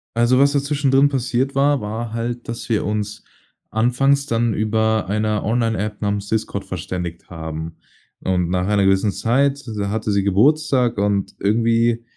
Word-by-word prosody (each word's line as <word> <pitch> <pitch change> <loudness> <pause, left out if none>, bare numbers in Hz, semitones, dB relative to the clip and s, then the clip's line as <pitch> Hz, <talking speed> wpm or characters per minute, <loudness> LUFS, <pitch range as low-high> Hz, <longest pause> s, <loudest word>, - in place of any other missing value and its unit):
Also, 120 +2 +3
was 140 +1 +4
da 140 - +3
zwischendrin 140 -1 +2
passiert 130 0 -1
war, 140 -1 +2
war 110 +2 -4
halt, 120 +1 -4
dass 115 +1 -6
wir 110 - +1
uns 105 0 -3 0.5
anfangs 135 +5 +2
dann 115 -4 0
über 110 -1 0
einer 105 +1 0
Online 115 -1 0
App 105 +2 -4
namens 100 0 -2
Discord 110 -2 -2
verständigt 90 -1 -5
haben. 80 -1 -6 0.4
Und, 90 -2 0
nach 90 +1 0
einer 105 -1 +2
gewissen 95 +2 +3
Zeit, 140 +7 +1
da 100 -1 -1
hatte 110 0 -2
sie 100 -1 +1
Geburtstag 125 +4 +2
und 100 -1 0
irgendwie 115 +2 +2
110 Hz, 160 wpm, -20 LUFS, 100-125 Hz, 0.5 s, was